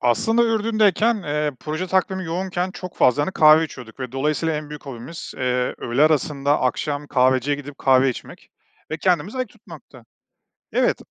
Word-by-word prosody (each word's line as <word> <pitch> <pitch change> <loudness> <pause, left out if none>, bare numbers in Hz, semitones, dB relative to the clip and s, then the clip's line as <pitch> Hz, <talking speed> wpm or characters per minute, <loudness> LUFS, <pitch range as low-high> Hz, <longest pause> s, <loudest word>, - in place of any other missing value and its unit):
Aslında, 225 - +2
Ürdün'deyken, 220 0 +2
eee, 150 -1 -1
proje 155 +4 -3
takvimi 190 0 0
yoğunken 180 +2 -2
çok 185 -1 -9
fazla, 130 +3 +3
hani, 190 - -2
kahve 155 +1 +6
içiyorduk 125 -4 -11
ve 125 -1 -5
dolayısıyla 150 +3 0
en 150 0 -6
büyük 150 -1 -9
hobimiz, 135 +5 -8
eee, 125 -1 -1
öğle 120 +4 0
arasında, 145 -2 +2
akşam 145 +3 -1
kahveciye 130 +1 +2
gidip 145 -1 -10
kahve 130 0 +4
içmek 125 - -10 0.4
ve 155 - -2
kendimizi 180 - 0
ayık 255 -3 -2
tutmaktı. 155 - -15 0.7
Evet, - - +1
150 Hz, 155 wpm, -22 LUFS, 135-185 Hz, 0.7 s, kahve